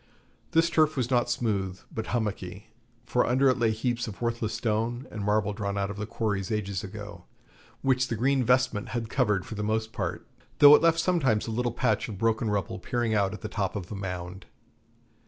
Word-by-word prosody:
This 165 +1 +4
turf 155 -2 +3
was 125 0 -1
not 120 -1 +2
smooth, 100 -6 -1
but 110 - -4
hummocky, 105 -2 -3 0.3
for 125 - +2
under 130 +2 +3
it 130 - +1
lay 115 -1 +3
heaps 120 +2 -1
of 105 - -8
worthless 115 -2 -2
stone 115 +3 -1
and 105 -1 -5
marble 105 0 +1
drawn 100 -1 -3
out 100 0 -1
of 105 - -8
the 105 0 -4
quarries 105 -4 -2
ages 100 -3 -2
ago, 105 0 -8 0.6
which 130 -1 +2
the 115 - -2
green 130 +3 +2
vestment 125 -3 +2
had 115 -1 -4
covered 105 -8 +1
for - - -7
the 105 - -4
most 110 +1 -1
part, - - -3 0.3
though 145 0 +10
it - - +3
left 165 0 +4
sometimes 155 -12 +2
a 115 - -4
little 120 +2 0
patch 110 -1 0
of 105 - -6
broken 115 +1 +1
rubble 105 +2 -2
peering 120 -2 -1
out 100 -2 +2
at - - -11
the - - -4
top - - -2
of 95 -2 -5
a - - -4
mound. 90 -1 -6
110 Hz, 205 wpm, -27 LUFS, 105-125 Hz, 0.6 s, though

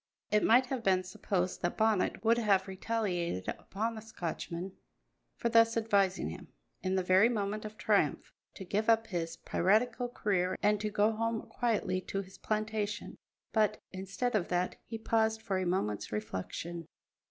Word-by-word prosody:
It 210 0 +4
might 245 +3 +6
have 255 -1 -3
been 185 -2 +3
supposed 185 0 -2
that 175 - -1
Bonnet 215 -1 +1
would 230 +1 +5
have 200 -4 +3
retaliated 185 - -2
upon 220 +4 -3
the 220 - -7
Scotchman 180 -3 -5 0.6
for 235 - -1
thus 230 0 +5
advising 200 -4 +2
him, - - -9 0.3
in 185 0 0
the 190 - +1
very 185 +5 +5
moment 210 -2 -2
of 215 0 -8
triumph, - - +1 0.2
to 190 - -8
give 210 +5 0
up 225 0 +4
his 170 -6 -3
piratical 225 +6 +1
career 190 -6 0
and 210 0 +3
to 215 - -1
go 210 +1 +3
home 230 0 -1
quietly 210 -6 -1
to 195 +2 -3
his 190 0 -15
plantation, 215 -1 -2 0.4
but, 215 -2 +2
instead 195 +6 -3
of 205 -5 +1
that, 180 0 -1
he 225 - -4
paused 220 0 +1
for 195 -4 0
a 185 - -1
moment's 105 - -1
reflection. 110 - -4
205 Hz, 165 wpm, -32 LUFS, 185-225 Hz, 0.6 s, might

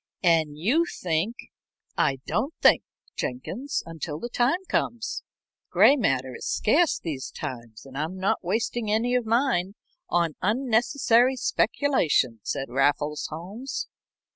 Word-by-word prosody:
"And 160 -4 +3
you 250 - +2
think 180 - -1 0.3
" - - -47
"I 135 - +2
don't 275 +9 -1
think, - - +6 0.3
Jenkins, 210 - -3
until 160 -2 -5
the 240 - -5
time 275 +11 +1
comes. 230 -1 -1 0.5
Gray 280 - +6
matter 130 - 0
is - - -6
scarce 310 +9 +3
these 145 -6 -5
times, 115 -2 -7
and 135 -1 -12
I'm 160 +6 -3
not 190 +1 0
wasting 220 +4 -1
any 225 +4 +1
of 250 -3 +1
mine 225 -6 +1 0.3
on 170 -3 +1
unnecessary 240 +3 +3
speculation," 165 - +1
said 135 +5 -3
Raffles 145 +3 +1
Holmes. 195 - -6
190 Hz, 130 wpm, -26 LUFS, 150-245 Hz, 0.5 s, think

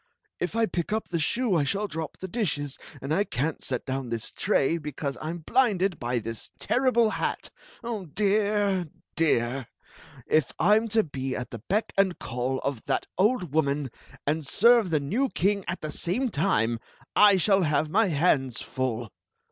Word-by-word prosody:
If - - -2
I 230 0 +3
pick 175 -3 -3
up 220 +1 -1
the 170 - -1
shoe 230 +5 +1
I 155 - +3
shall 200 +9 0
drop 160 -3 -5
the 190 - -6
dishes; 150 - -2 0.2
and 140 +3 -1
I 200 - +3
can't 150 - -2
set 125 -2 -2
down 130 -1 -3
this 115 -2 -4
tray 165 +5 +1
because 145 -2 -4
I 155 - -5
*m 170 -1 -5
blinded 200 -8 +2
by 120 +1 -1
this 115 -1 -5
terrible 245 -3 +2
hat! - - -2 0.6
Dear 205 -3 +2
— - - -52
dear! 130 -6 +1 0.6
If 155 -4 +2
I 210 - +5
*m 225 +1 0
to 220 0 +3
be 135 -4 -4
at 125 -1 -5
the 115 - -6
beck 200 - -1
and 190 -2 +3
call 125 +2 -2
of 140 -5 -2
that - - 0
old 190 - +2
woman, 140 -4 +1 0.3
and 155 +2 0
serve 230 - +4
the 155 -2 +2
new 220 - 0
king 200 0 +1
at 175 - -3
the 155 - -4
same 240 - 0
time, 115 - +1 0.4
I 205 -2 +7
shall 195 +2 +3
have 150 -2 +1
my 220 +3 +4
hands 140 -6 +2
full. 120 -4 -3
165 Hz, 180 wpm, -27 LUFS, 135-205 Hz, 0.6 s, I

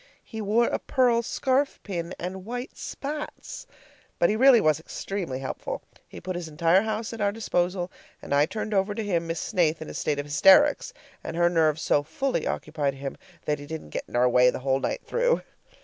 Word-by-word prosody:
He 220 - -7
wore 215 +3 +3
a - - -1
pearl 245 -3 +2
scarf 265 +4 0
pin 175 -3 -4
and 185 +2 -5
white 245 +5 -6
spats! 300 - -6 0.5
But 170 - +3
he - - +1
really 255 +1 +7
was 155 -5 +2
extremely 170 -3 -4
helpful. 130 0 -5 0.2
He - - -10
put 185 0 -5
his 175 -2 -4
entire 165 +4 +3
house 220 +1 -3
at 225 - -6
our 200 0 +2
disposal, 180 -4 -1 0.3
and - - -5
I 145 +2 +4
turned 215 +2 -4
over 200 +1 +1
to 225 - -2
him 170 -5 -1
Miss 165 0 -2
Snaith 170 -6 +1
in 160 - -7
a - - -9
state 150 - -1
of 145 - -3
hysterics; 195 - +5 0.3
and 165 - -5
her 175 0 +3
nerves 160 -2 +2
so 145 - +3
fully 270 - -2
occupied 150 -3 -2
him 135 0 -5 0.3
that 150 -1 0
he 145 - -9
didn't 160 - -7
get - - -4
in - - -9
our 125 +1 +4
way 125 0 +5
the - - -2
whole 135 0 +2
night - - -3
through. - - +1
180 Hz, 205 wpm, -26 LUFS, 155-225 Hz, 0.5 s, really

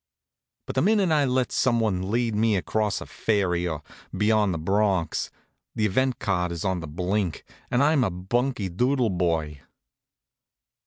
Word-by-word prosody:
But - - -5
the 130 - +1
minute 200 0 +3
I 150 -2 +3
lets 130 -1 0
some 120 -3 +2
one 95 -4 -1
lead 115 +1 0
me 110 0 +2
across 105 +2 -1
a - - -6
ferry, 90 -5 0
or 80 -4 -4 0.3
beyond 105 -1 +3
the 85 - -2
Bronx, 95 0 0 0.5
the 110 - +1
event 130 +5 +1
card 90 -6 -1
is 85 +2 -4
on 95 -2 0
the 80 - -7
blink, 90 +2 -2 0.3
and 125 +3 +2
I'm 145 -2 +3
a 110 - +1
bunky 105 +5 -1
doodle 125 +5 +1
boy. 80 -5 -1
105 Hz, 160 wpm, -25 LUFS, 90-125 Hz, 0.5 s, minute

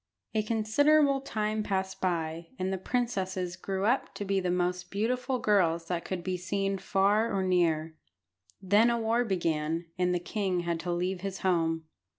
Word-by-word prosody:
A 220 - +2
considerable 275 +7 +3
time 215 -4 -1
passed 190 -2 -2
by, 165 -2 -1
and 185 +1 -1
the 190 - -2
princesses 190 -6 -2
grew 190 +1 -3
up 245 +5 +1
to 205 - -4
be 195 0 +1
the 180 -1 -1
most 180 0 -1
beautiful 250 +5 -1
girls 170 -7 +2
that 175 -2 -2
could 185 -2 -4
be 185 0 -2
seen 195 +2 -1
far 200 +4 +2
or 195 -2 0
near. 165 -4 +1 0.6
Then 205 +5 +4
a 235 - +1
war 230 +2 +2
began, 165 -5 -1
and 180 0 +2
the 180 - +2
king 185 0 -1
had 170 -1 -2
to 175 +1 -3
leave 180 +1 -1
his 195 0 -5
home. 165 -3 +1
190 Hz, 170 wpm, -29 LUFS, 175-215 Hz, 0.6 s, Then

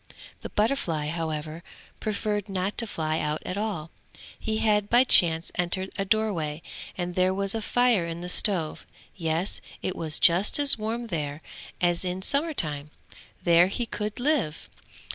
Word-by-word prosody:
The - - -6
butterfly 185 - 0
however 160 -1 -4 0.4
preferred 210 -1 -2
not 190 +1 -2
to 230 - +2
fly 155 -4 -2
out 150 0 -2
at 180 - -3
all; 200 -7 -3 0.5
he 220 0 -2
had 210 -2 +2
by 240 +2 +6
chance 165 -9 +4
entered 180 +2 0
a 195 - -1
door 215 +1 +2
way, 155 -2 -4 0.3
and 175 -1 -3
there 185 +1 +2
was 195 0 -1
fire 225 -4 +2
in 165 +1 -5
the 175 - -5
stove 180 -4 +2 0.3
yes, 165 +1 -2 0.2
it 185 - -2
was 160 -2 0
just 175 +4 +4
as 285 -1 +4
warm 230 +2 -3
there, 145 -1 -3 0.4
as 175 0 +1
in 185 +1 -3
summer 295 - +1
time; 150 - +2 0.5
there 170 +1 +6
he 235 +5 -2
could 210 0 -4
live. 250 - 0
185 Hz, 160 wpm, -26 LUFS, 165-215 Hz, 0.5 s, by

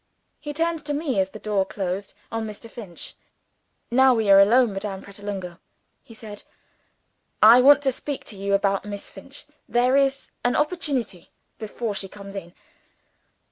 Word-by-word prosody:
He 295 - -6
turned 330 +1 -1
to 290 - -1
me, 285 -8 -1
as 190 0 +1
the 215 - -10
door 210 -2 0
closed 190 0 -4 0.2
on 225 -1 -3
Mr. 215 +2 -9
Finch. 210 -7 -8 0.8
"Now 260 +1 +5
we 220 -3 +2
are 195 - +9
alone, 230 +2 +5
Madame 195 -1 -5
Pratolungo," 195 -3 -7 0.4
he 225 - -15
said, 210 -2 -10 1.0
"I 230 +4 +8
want 285 +2 +7
to 270 - +2
speak 280 +2 -6
to 210 - -9
you 200 0 0
about 195 0 +1
Miss 205 -1 -7
Finch. 270 +9 -11 0.2
There 250 +2 +3
is 275 0 +1
an 245 - +1
opportunity, 295 - -2 0.3
before 220 0 -4
she 195 -1 -5
comes 200 0 -11
in. 175 -2 -8
215 Hz, 160 wpm, -24 LUFS, 195-265 Hz, 1.0 s, are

